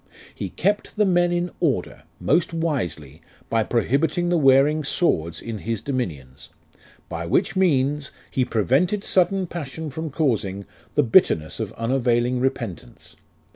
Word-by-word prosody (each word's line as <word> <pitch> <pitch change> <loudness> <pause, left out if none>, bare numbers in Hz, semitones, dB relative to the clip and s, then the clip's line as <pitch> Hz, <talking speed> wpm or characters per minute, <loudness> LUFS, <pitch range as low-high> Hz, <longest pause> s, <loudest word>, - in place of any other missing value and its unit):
He 100 - -5
kept 205 - -1
the 210 - +3
Men 175 -2 +3
in 175 0 -1
order; 135 - -1
most 170 -1 +1
wisely, 90 - -3 0.3
By 115 - +3
prohibiting 140 +10 +1
the 175 - +2
wearing 140 +2 +4
swords 85 - 0
in 115 -2 -5
his 115 0 -3
dominions; 80 - -5 0.6
By 85 0 -5
which 85 - +1
means 145 -5 +1 0.2
He 130 - +1
prevented 135 - +1
sudden 190 +1 +2
passion 160 -2 -6
from 160 +3 -4
causing 110 - -1 0.3
The 150 - +4
bitterness 110 - +3
of - - -3
unavailing 120 +1 +1
repentance. 120 - -4
135 Hz, 135 wpm, -23 LUFS, 110-170 Hz, 0.6 s, wearing